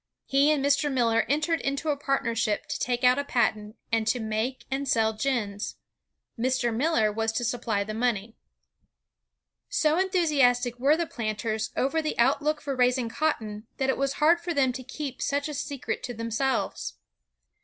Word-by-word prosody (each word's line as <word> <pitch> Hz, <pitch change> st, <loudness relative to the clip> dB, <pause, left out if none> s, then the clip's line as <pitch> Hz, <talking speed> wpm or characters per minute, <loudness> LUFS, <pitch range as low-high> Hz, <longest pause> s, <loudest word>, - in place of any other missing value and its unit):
He 275 Hz, +2 st, +3 dB
and 290 Hz, -3 st, +2 dB
Mr. 285 Hz, +1 st, +2 dB
Miller 230 Hz, -3 st, +2 dB
entered 310 Hz, +3 st, +1 dB
into 275 Hz, +3 st, -2 dB
a 295 Hz, -, +2 dB
partnership 230 Hz, -6 st, 0 dB
to -, -, -3 dB
take 245 Hz, 0 st, -1 dB
out 250 Hz, +2 st, +5 dB
a -, -, 0 dB
patent, 215 Hz, -5 st, 0 dB, 0.2 s
and 225 Hz, -1 st, +1 dB
to 245 Hz, +2 st, +2 dB
make 220 Hz, +4 st, -2 dB
and 275 Hz, +1 st, -2 dB
sell 220 Hz, -3 st, +2 dB
gins. 215 Hz, -4 st, -2 dB, 0.6 s
Mr. 245 Hz, -1 st, +1 dB
Miller 230 Hz, -5 st, +2 dB
was 225 Hz, +1 st, -1 dB
to 240 Hz, -, -1 dB
supply 230 Hz, -3 st, -1 dB
the 215 Hz, +1 st, -6 dB
money. 225 Hz, -2 st, -1 dB, 1.3 s
So 310 Hz, +2 st, +2 dB
enthusiastic 275 Hz, -, +2 dB
were 285 Hz, +5 st, +4 dB
the 340 Hz, -, 0 dB
planters 220 Hz, -3 st, -3 dB
over 300 Hz, +5 st, +1 dB
the 310 Hz, -, -3 dB
outlook 290 Hz, +5 st, +2 dB
for 280 Hz, -2 st, -3 dB
raising 250 Hz, -1 st, +2 dB
cotton, 225 Hz, -7 st, -2 dB
that 265 Hz, 0 st, +2 dB
it -, -, -3 dB
was 275 Hz, 0 st, +1 dB
hard 325 Hz, +4 st, +3 dB
for 345 Hz, 0 st, -3 dB
them 265 Hz, -3 st, +3 dB
to 255 Hz, -, -6 dB
keep 270 Hz, 0 st, -6 dB
such 285 Hz, +1 st, 0 dB
a 300 Hz, -, -5 dB
secret 280 Hz, -1 st, -4 dB
to 245 Hz, -1 st, -5 dB
themselves. 230 Hz, +4 st, -2 dB
255 Hz, 170 wpm, -27 LUFS, 225-285 Hz, 1.3 s, out